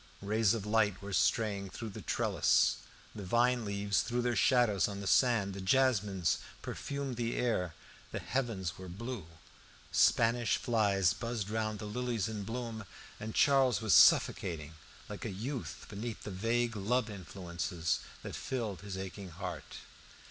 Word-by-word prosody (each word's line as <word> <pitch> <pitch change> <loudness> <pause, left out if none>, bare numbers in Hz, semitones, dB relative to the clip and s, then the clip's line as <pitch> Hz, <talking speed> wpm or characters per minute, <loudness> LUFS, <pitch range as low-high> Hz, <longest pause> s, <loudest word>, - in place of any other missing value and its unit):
Rays 110 +1 +2
of 105 -3 -4
light 105 -3 +2
were 100 0 -7
straying 100 -1 +1
through 115 +3 -6
the - - -8
trellis, - - +2 0.4
the 105 - -7
vine 120 +5 +2
leaves 100 -1 0
threw 120 +1 -1
their 120 -1 +1
shadows 110 -1 +3
on 100 -1 -5
the 100 - -6
sand, 105 -3 +3
the 100 - -6
jasmines 105 -5 +2 0.2
perfumed 140 -3 -4
the 120 -1 -1
air, 90 -9 0 0.4
the - - -3
heavens 105 -10 -2
were 95 -1 -8
blue, 110 -1 -6 0.6
Spanish 115 0 +3
flies 100 -7 +2
buzzed 115 -3 -4
round 110 -1 -1
the 105 - -7
lilies 115 -1 -2
in 110 -2 -4
bloom, 115 -1 -5 0.3
and 110 +1 -6
Charles 135 -4 +4
was 110 -4 +2
suffocating 80 -2 +5 0.3
like - - -7
a - - -3
youth 120 +7 -5
beneath 110 +2 -6
the 105 - -5
vague 115 +4 0
love 110 +4 +1
influences 90 -3 -3 0.2
that - - -6
filled 115 -8 -3
his 100 -2 -6
aching 95 0 -6
heart. 90 -1 -7
105 Hz, 150 wpm, -32 LUFS, 95-120 Hz, 0.6 s, suffocating